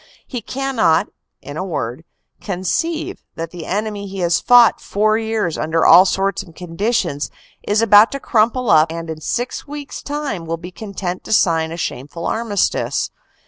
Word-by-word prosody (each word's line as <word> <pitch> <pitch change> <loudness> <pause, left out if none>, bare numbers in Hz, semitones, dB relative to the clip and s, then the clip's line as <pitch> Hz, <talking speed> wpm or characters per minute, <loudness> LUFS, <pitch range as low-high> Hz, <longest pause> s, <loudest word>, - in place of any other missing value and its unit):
He 245 -3 -5
cannot, 255 -13 +1 0.3
in 145 +2 -7
a - - -2
word, 145 -5 -4 0.4
conceive 320 - -2
that 165 0 -5
the 175 -3 -8
enemy 205 +1 -3
he 195 0 -8
has 170 0 +2
fought 245 +1 +5
four 215 +2 +1
years 220 -7 -2
under 160 +1 +1
all 180 +3 +8
sorts 195 +1 0
of 170 -5 -14
conditions, 180 -3 -1 0.4
is 210 +2 +2
about 210 0 +7
to 275 - -3
crumple 240 0 +1
up 155 +1 +5
and 165 0 -5
in 155 -1 -7
six 245 - -3
weeks 290 -1 -7
time 285 - -4
will 165 +1 -2
be 175 +2 -9
content 185 -2 -5
to - - -1
sign 165 -5 +2
a 165 - -5
shameful 150 +1 -5
armistice. 220 -3 0
195 Hz, 165 wpm, -19 LUFS, 165-230 Hz, 0.4 s, all